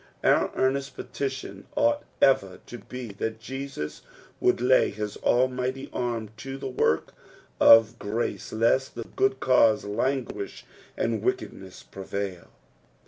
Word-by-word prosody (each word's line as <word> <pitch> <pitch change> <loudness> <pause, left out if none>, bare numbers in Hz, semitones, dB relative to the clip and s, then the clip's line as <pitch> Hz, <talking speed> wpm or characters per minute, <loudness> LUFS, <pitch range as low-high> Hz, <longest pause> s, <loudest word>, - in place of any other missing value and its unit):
Our - - +4
earnest 135 +1 0
petition 135 -2 -5
ought 290 0 +3 0.2
ever 100 -9 +3
to 120 - -9
be 125 +3 -8
that 110 0 -2
Jesus 135 - -6 0.4
would - - +3
lay 125 +1 +4
his 105 -1 -5
almighty 130 +1 0
arm 115 -3 -2
to 135 +4 -6
the 135 - -5
work 125 -11 0 0.5
of 115 +1 +7
grace 110 +4 -3
lest 115 +4 +1
the - - -4
good 395 +1 0
cause 115 -5 +4
languish 130 - -2 0.3
and - - 0
wickedness 100 - -3
prcvidl. 95 -2 -5
125 Hz, 125 wpm, -26 LUFS, 110-135 Hz, 0.5 s, of